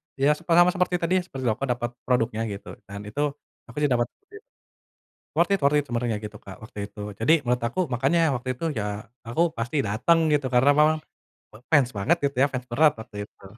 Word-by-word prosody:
ya 140 +2 +3
se 175 - -15
sama 175 +1 +6
seperti 180 -1 +1
tadi 170 - +1
ya, - - -4
seperti 135 -5 -7
aku 110 +5 -4
dapet 120 -1 -1 0.2
produknya 115 -3 +1
gitu, 100 - -8 0.2
dan 100 +1 -7
itu 110 +8 -3 0.5
aku 115 - -14
sih 145 - +3
dapet 120 -1 +2 0.2
dit 415 0 -12 0.9
worth - - +2
it - - -4
worth 140 +1 +4
it - - -2
sebenarnya 120 -3 -1
gitu, 105 0 -7
Kak, 95 - -9
waktu 110 -1 -10
itu. 105 - -14 0.2
Jadi 115 +8 +4
menurut 125 0 +1
aku, 130 - -5
makanya 135 +7 +2 0.2
waktu 125 +1 -5
itu, 125 - -10 0.2
ya - - -1 0.4
aku 120 +8 0 0.2
pasti 120 +5 -2
dateng 115 +12 +3
gitu, 145 -3 +2
karena 125 +3 +4
memang 155 +1 +4 0.6
me 105 - -13
fans 140 -5 +5
banget 100 - +2
gitu 140 -1 0
ya, 140 - +6
fans 125 -1 -3
berat 150 +5 +4
waktu 110 -1 -11
itu. - - -23
125 Hz, 210 wpm, -25 LUFS, 115-150 Hz, 0.9 s, sama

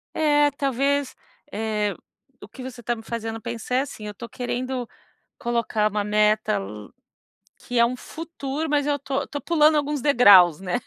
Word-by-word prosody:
É, 295 -1 +3
talvez, 275 0 0 0.4
eh, 210 -1 -1 0.5
o - - -10
que 265 - -12
você 250 -2 -8
está 240 +1 -1
me 225 - -11
fazendo 225 -1 -5
pensar, 235 +1 -4
é 260 - +3
assim, 240 -6 -7
estou 210 +3 -8
querendo, 250 0 -4 0.5
colocar 230 -3 0
uma 210 0 -1
meta, 210 - +2 1.0
que 245 -1 -4
é 235 - +6
um 250 +2 -3
futuro, 315 0 -5
mas 290 -1 +1
eu 290 -1 +1
estou 275 0 -3
estou 285 - -6
pulando 310 -2 +4
alguns 295 0 -1
degraus, 200 - +6
né, 190 +5 -2
245 Hz, 160 wpm, -24 LUFS, 220-285 Hz, 1.0 s, é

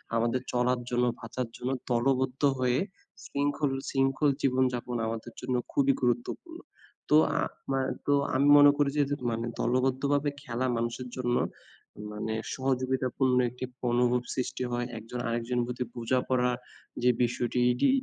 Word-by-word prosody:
আমাদের 115 +2 +1
চলার 125 0 +2
জন্য, 125 0 +2
বাঁচার 120 +1 -4
জন্য 125 +2 -2 0.2
দলবদ্ধ 130 +2 +1 0.2
হয়ে 125 0 +2 0.5
শৃঙ্খল, 145 0 0 0.2
শৃঙ্খল 135 +2 +2
জীবনযাপন 125 -2 +1
আমাদের 115 +1 -5
জন্য 125 - -1 0.2
খুবই 140 -1 +3
গুরুত্বপূর্ণ। 125 - -1 0.5
তো 150 - +5 0.2
আ - - +2 0.2
আমা 135 0 0 0.3
তো 145 - +3 0.2
আমি 140 +2 +3
মনে 145 0 +9
করি 145 -1 +3
যে 145 - +5 0.3
মানে 115 +1 -2
দলবদ্ধভাবে 135 +3 +1
খেলা 120 +2 -2
মানুষের 120 +2 -3
জন্য 120 -1 0 0.8
মানে 110 +1 -3 0.2
সহযোগিতা 130 0 0
পূর্ণ 130 -2 +3
একটি 125 +2 -6 0.3
অনুভব 125 0 +3
সৃষ্টি 130 0 -2
হয়। 120 0 -1
একজন 115 +3 -6
আরেকজন 120 +1 -1
প্রতি 125 +1 -3
বোঝা 120 +2 +1
পড়া 125 -1 +2 0.5
যে 125 - +5
বিষয়টি 120 +1 0
এটি, 125 - +2
125 Hz, 140 wpm, -29 LUFS, 120-135 Hz, 0.8 s, মনে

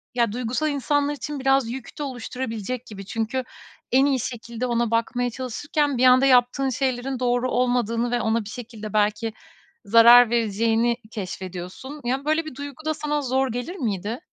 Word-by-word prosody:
ya, 235 -4 +2
duygusal 250 +6 -1
insanlar 290 0 0
için 295 0 -5
biraz 270 -2 +2
yük 250 0 -7
de - - -2
oluşturabilecek 250 -2 -5
gibi. 195 -2 -9
Çünkü 225 +4 -2 0.5
en 265 +2 +5
iyi 275 -2 +2
şekilde 235 0 -4
ona 235 -2 0
bakmaya 240 +2 0
çalışırken 275 +3 -2
bir 255 - +3
anda 255 +1 +6
yaptığın 255 +1 +4
şeylerin 260 0 -2
doğru 245 0 +1
olmadığını 245 -1 +1
ve 245 -1 +1
ona 220 0 0
bir 205 - -8
şekilde 220 -3 -8
belki 215 +1 +1 0.5
zarar 230 +3 +8
vereceğini 230 +1 +1
keşfediyorsun. 190 +7 -7
Ya, 260 +3 -2
böyle 310 +2 +1
bir 310 - -8
duygu 285 +2 -8
da 310 - +1
sana 295 -1 -2
zor 265 0 +1
gelir 245 +10 -4
miydi? 220 - -3
245 Hz, 165 wpm, -24 LUFS, 230-270 Hz, 0.5 s, zarar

